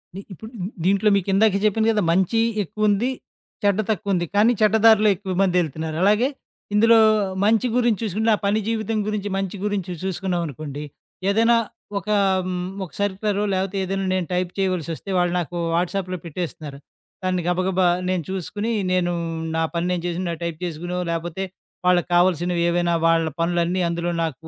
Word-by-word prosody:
పని. 195 - -6
ఇప్పుడు 220 +5 -11 0.3
దీంట్లో 200 +2 +3
మీకిందాకే 195 +2 +3
జెప్పాను 220 +1 +2
గదా! 215 -1 +1
మంచి 190 +6 +2 0.2
ఎక్కువుంది, 215 +4 0 0.5
చెడ్డ 200 0 +2
తక్కువుంది. 195 -3 0
కానీ 215 +4 +5
చెడ్డ 215 0 +4
దారిలో 215 -1 +7
ఎక్కువ 190 0 -5
మందెళ్తున్నారు. 160 -4 0
అలాగే 210 +6 +4 0.5
ఇందులో 230 +2 +6 0.5
మంచి 225 +3 +3
గురించి 240 -4 +2
చూసుకుంటే 220 +2 0
ఆ - - -6
పని 210 +2 +2
జీవితం 225 -1 -1
గురించి, 210 -1 -2
మంచి 195 0 -3
గురించి 195 -3 -2
చూసుకున్నాం 190 -1 -2
అనుకోండి, 145 0 -7 0.5
ఏదైనా 230 +3 +4 0.4
ఒక 200 - -17 0.4
హ్మ్. 180 0 -3 0.2
ఒక 175 - -8
సర్క్యులర్ 205 +1 -1 0.2
లేపోతే 190 +1 -2
ఏదైనా 195 +1 -2
నేను 185 -2 0
టైప్ 180 0 -1
చేయవలసొస్తే 185 -1 -2
వాళ్ళు 175 0 +2
నాకు 175 +1 -4 0.2
వాట్స‌ప్‌లో 180 +1 -1
పెట్టేస్తున్నారు. 155 -4 -6 0.5
దాన్ని 185 -1 0
గబగబా 185 +1 +2 0.2
నేను 185 -3 0
చూసుకుని 205 +4 -3 0.2
నేను 180 -1 +1 0.4
నా 165 - +1
పని 170 0 -1
నేను 175 -2 -2
చేసిన 175 0 -2
టైప్ 170 -2 -3
చేసుకోనో, 175 +1 -4
లేపోతే 170 +3 -3 0.4
వాళ్ళకావాల్సినవేవైనా 175 -1 +2
వాళ్ళ 165 -1 +3
పనులన్నీ 175 +2 +1
అందులో 170 +1 -2
నాకు 160 0 -5
185 Hz, 145 wpm, -22 LUFS, 175-205 Hz, 0.5 s, దారిలో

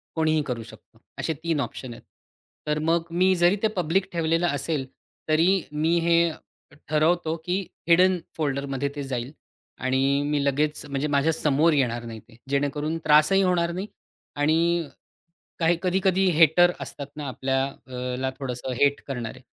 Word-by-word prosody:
कोणीही 155 -1 +2
करू 120 -4 -4
शकतो? 110 0 -17 0.2
असे 160 - -1
3 165 -3 0
ऑप्शन 130 -3 -6
आहेत. - - -14 0.6
तर 150 0 0
मग 165 0 +2
मी 185 +2 +3
जरी 175 +2 +4
ते - - +5
पब्लिक 180 +2 0
ठेवलेलं 165 0 +1
असेल 145 -2 -2 0.4
तरी 175 +5 +3
मी 160 +3 +1
हे 170 0 +2 0.8
ठरवतो 160 +2 +2
की 180 +2 0 0.3
हिडन 180 +2 +5 0.2
फोल्डरमध्ये 140 -2 -2
ते 145 - -4
जाईल 125 -1 -4 0.5
आणि 135 +2 +1
मी 145 -1 0
लगेच 150 +2 0
म्हणजे 140 +1 -2
माझ्यासमोर 150 +1 +2
येणार 120 -5 0
नाही 115 -1 -7
ते. 115 +1 -20
जेणेकरून 145 +3 -1
त्रासही 155 +6 +5
होणार 175 -2 +1
नाही 185 +4 -4 0.5
आणि 165 +3 +1 0.7
काही 165 0 +3
कधी-कधी 190 +1 +2
हेटर 175 +3 +6
असतात 140 -1 -7
ना 145 -2 -5
आपल्याला 130 -1 -3
थोडंसं 130 -1 -4
हेट 140 0 +3
करणारे. 125 -2 -5
150 Hz, 140 wpm, -25 LUFS, 135-170 Hz, 0.8 s, हेटर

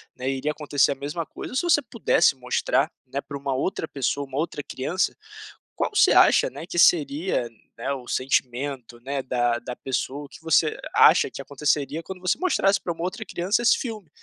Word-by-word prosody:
né, 130 +1 -3
iria 135 +3 -1
acontecer 145 -2 +1
a 140 - -2
mesma 145 +4 -4
coisa? - - -9
Ou - - -5
se - - +1
você 340 -4 +4
pudesse 230 - +2
mostrar, 125 -1 0 0.2
né, 135 +2 -3
pra 140 -1 -7
uma 140 -1 -3
outra 160 +3 -2
pessoa, 140 +1 -2
uma 135 +1 -6
outra 155 -1 -2
criança, 155 +7 -2 0.6
qual - - -1
você 415 - +5
acha, - - +5
né, 165 - -9
que 175 - -3
seria 150 -5 +3 0.5
o 125 -2 -13
sentimento 130 -1 -2 0.3
da 120 -1 +1
da 125 0 -7
pessoa? 135 +3 -3
O 140 - -15
que - - -14
você 160 -1 +2 0.2
acha - - +6
que - - -8
aconteceria 150 +2 -1
quando 185 +2 -9
você 180 -1 +1
mostrasse 200 - +2
pra 170 - -3
uma 165 - -7
outra 180 - -4
criança 190 +7 0
esse 235 - +4
filme, 215 - -6
145 Hz, 190 wpm, -24 LUFS, 135-175 Hz, 0.6 s, acha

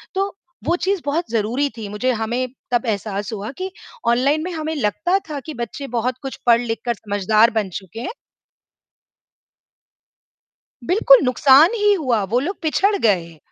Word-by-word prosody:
तो 390 0 -1 0.3
वो 345 - +1
चीज़ 380 0 -1
बहुत 320 +4 0
ज़रूरी 235 +6 0
थी 215 -2 -5
मुझे 250 +5 0
हमें 235 +3 -2 0.2
तब 240 0 +1
एहसास 205 -1 -2
हुआ 210 +4 -5
कि 375 0 -4 0.4
ऑनलाइन 275 +6 +2
में 365 - -4
हमें 315 0 -3
लगता 310 - +1
था 290 -2 -4
कि 310 - -6
बच्चे 240 +4 -6
बहुत 240 +1 0
कुछ 270 - -5
पढ़-लिख 235 -1 +3
कर 240 - +1
समझदार 210 +3 +2
बन 205 -3 0
चुके 190 +3 -11
हैं। - - -4 2.8
बिल्कुल 450 - +6
नुकसान 275 - +5
ही 415 -2 +3
हुआ, 250 - 0
वो 235 +6 0
लोग 365 +8 -3
पिछड़ 395 +6 +2
गए। 170 - 0
250 Hz, 155 wpm, -20 LUFS, 220-320 Hz, 2.8 s, बिल्कुल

